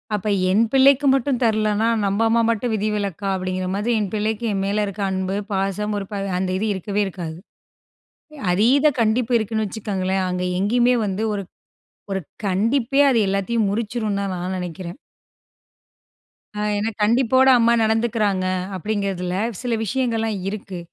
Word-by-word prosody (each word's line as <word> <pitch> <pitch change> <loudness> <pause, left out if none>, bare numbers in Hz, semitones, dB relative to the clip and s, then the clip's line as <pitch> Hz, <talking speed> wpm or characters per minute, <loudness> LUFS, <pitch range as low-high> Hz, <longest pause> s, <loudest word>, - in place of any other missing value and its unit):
அப்ப 210 +1 -4 0.2
என் 210 +4 +4
பிள்ளைக்கு 275 +1 +5
மட்டும் 270 -1 0
தரல்லைன்னா, 215 0 +2 0.2
"நம்ப 200 +3 0
அம்மா 230 +1 +3
மட்டும் 230 +1 0
விதிவிலக்கா?" 205 -2 -2
அப்படிங்கிற 185 0 -3
மாதிரி, 210 +4 -1
என் 200 -3 -2
பிள்ளைக்கு 215 +2 -1
என் 195 - -1
மேல 210 +1 0
இருக்கிற 200 0 -3
அன்பு, 190 0 -2 0.2
பாசம் 195 +2 -1
ஒரு 195 - -5
ப 205 - -4 0.2
அந்த 185 0 -1
இது 215 +3 -1
இருக்கவே 200 +2 -2
இருக்காது. 170 -4 -6 1.1
அதீத 240 +10 +3 0.2
கண்டிப்பு 230 +2 +1
இருக்குன்னு 220 0 -1
வச்சுக்கோங்களேன், 190 -2 -2
அங்கே 180 0 -2
எங்கேயுமே 240 +5 +3
வந்து 200 +2 -2
ஒரு 200 -1 -3 0.7
ஒரு 195 0 -1 0.2
கண்டிப்பே 230 +8 +1
அது 240 - +3
எல்லாத்தையும் 200 +2 0
முறிச்சிடும் 215 0 -2
தான் 200 -1 -2
நான் 180 +1 -3
நினைக்கிறேன். 175 +1 -6 1.6
ஆ - - -1 0.2
ஏன்னா 215 +2 -1
கண்டிப்போட 255 +4 +4
அம்மா 235 0 +4
நடந்துக்கிறாங்க 220 -4 +1 0.3
அப்படிங்கிறதில, 190 -2 -2 0.3
சில 245 -2 -1
விஷயங்கள்லாம் 225 -2 -1
இருக்கு. 195 -3 -6
210 Hz, 140 wpm, -21 LUFS, 195-230 Hz, 1.6 s, பிள்ளைக்கு